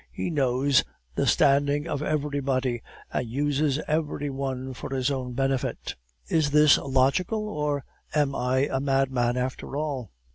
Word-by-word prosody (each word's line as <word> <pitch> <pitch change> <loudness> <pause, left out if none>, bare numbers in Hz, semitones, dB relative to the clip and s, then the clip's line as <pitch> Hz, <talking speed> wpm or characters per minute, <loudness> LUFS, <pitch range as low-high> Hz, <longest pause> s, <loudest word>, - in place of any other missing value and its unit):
He 175 - -3
knows 135 -2 +3 0.3
the - - 0
standing 145 +2 +3
of 145 -3 -2
everybody, 140 -5 -1 0.3
and 120 - -1
uses 145 +3 0
every 150 -2 -1
one 130 -1 -3
for 130 - -7
his 130 +1 +1
own 130 -2 -3
benefit. 135 0 -1 0.3
Is 155 -3 +2
this 150 0 +6
logical, 140 - +1
or 150 -6 -2 0.3
am 145 -2 +2
I 130 +2 +1
a 135 - +1
madman 135 -3 +1
after 130 +2 -3
all? 140 -7 -3
140 Hz, 140 wpm, -26 LUFS, 130-145 Hz, 0.3 s, this